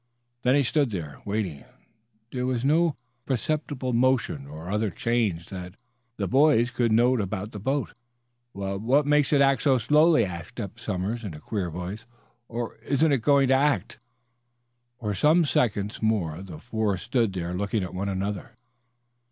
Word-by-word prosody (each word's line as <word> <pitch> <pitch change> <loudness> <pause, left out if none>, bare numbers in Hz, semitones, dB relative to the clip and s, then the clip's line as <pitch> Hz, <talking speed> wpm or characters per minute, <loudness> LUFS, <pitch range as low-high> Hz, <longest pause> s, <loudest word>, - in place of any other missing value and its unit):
Then 125 +2 +3
he 145 - +4
stood 140 +1 +1
there, 80 -8 -6
waiting. 100 -8 -3 0.7
There 125 -1 -2
was 130 -1 -1
no 160 +2 +3 0.3
perceptible 135 0 -1
motion 115 - +1
or 80 +5 -8
other 105 +1 +1
change 100 -4 -1
that 90 -1 -7 0.4
the - - -1
boys 135 -3 +4
could 120 -2 +1
note 120 +2 +4
about 100 +2 -4
the 105 - -7
boat. 135 +5 -1 0.6
"Wha 100 -1 -4
what 130 +8 +2
makes 150 -1 +3
it 145 -2 +4
act 135 -3 +4
so 135 -3 +4
slowly?" 150 0 +4
asked 90 +6 -8
Eph 105 +1 -6
Somers, 105 +2 -3
in 95 -7 -5
a - - -9
queer 95 0 -3
voice. 90 +7 -6 0.4
"Or 120 0 -5
isn't 145 +3 +1
it 135 -4 +2
going 140 +2 +4
to - - +5
act?" 140 +2 +1 1.0
For 105 -2 -2
some 155 - +4
seconds 105 -6 0
more 95 -7 0
the 90 -5 -9
four 110 -3 -1
stood 115 0 0
there 90 -1 -3
looking 100 +2 -1
at 90 - -6
one 95 +2 -2
another. 100 +1 -4
110 Hz, 165 wpm, -26 LUFS, 95-130 Hz, 1.0 s, to